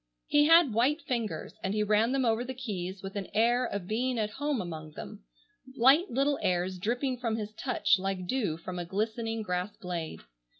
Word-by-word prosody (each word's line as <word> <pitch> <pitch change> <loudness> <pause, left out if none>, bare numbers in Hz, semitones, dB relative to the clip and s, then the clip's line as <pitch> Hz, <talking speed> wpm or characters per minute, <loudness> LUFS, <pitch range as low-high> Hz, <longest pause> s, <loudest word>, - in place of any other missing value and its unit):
He 295 0 +4
had 330 -6 +6
white 260 +8 +3
fingers, 235 -4 -3
and 195 +2 -1
he 210 - +2
ran 215 +3 +3
them 270 -1 +1
over 225 +1 +2
the 260 +1 -6
keys 195 -6 -5
with 195 +1 -6
an 200 -2 -3
air 240 +3 +3
of 200 -5 -4
being 245 +4 0
at 215 -1 -1
home 290 +1 -1
among 160 -4 -6
them, - - -9 0.5
light 275 +10 +5
little 275 +3 +1
airs 180 +1 0
dripping 250 +5 -1
from 230 -3 -1
his 215 -1 -5
touch 220 -4 +2
like 190 -1 -2
dew 200 -8 -1
from 180 +2 -6
a 175 - -3
glistening 220 +4 -2
grass 180 +1 -3
blade. 170 - -5
220 Hz, 195 wpm, -30 LUFS, 185-250 Hz, 0.5 s, had